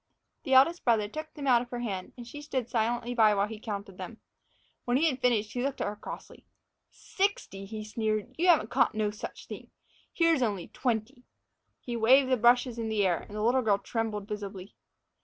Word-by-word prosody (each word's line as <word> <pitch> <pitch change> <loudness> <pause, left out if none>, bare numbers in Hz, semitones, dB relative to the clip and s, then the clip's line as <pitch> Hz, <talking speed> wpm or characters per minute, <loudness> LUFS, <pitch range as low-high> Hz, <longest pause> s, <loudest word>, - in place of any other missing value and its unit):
The 265 -2 +3
eldest 335 +7 +5
brother 225 -4 +2
took 310 +7 -7
them 290 -3 -6
out 245 -3 +5
of 245 - -8
her 245 -1 -4
hand, 195 -6 -4
and 240 - -8
she 290 +5 -9
stood 260 -5 -3
silently 240 +1 -1
by 215 -3 +5
while 200 0 +2
he 215 0 -8
counted 200 -3 -6
them. 220 +5 -8 0.6
When 245 +1 +1
he 320 +4 +3
had 265 -4 -2
finished, 220 -4 +1
he 245 - -2
looked 275 +1 -2
at - - -1
her 205 - -3
crossly. - - -10 0.5
"Sixty!" 380 - -2
he 215 +1 -6
sneered. 215 +2 -2
"You 350 +3 +1
haven't 325 -10 +4
caught - - +2
no 215 -1 0
such 210 - -8
thing! - - -9 0.4
Here's 330 -4 +3
only 205 -7 -1
twenty." 245 +1 -2 0.6
He 240 - -5
waved 260 +4 +5
the 255 - +4
brushes 240 +1 +3
in 225 -1 -2
the 210 -2 +1
air, 175 -2 +2
and 205 - -11
the 210 - -2
little 250 +3 +3
girl 210 -4 +3
trembled 215 -2 -3
visibly. 200 -2 -6
230 Hz, 205 wpm, -29 LUFS, 210-255 Hz, 0.6 s, eldest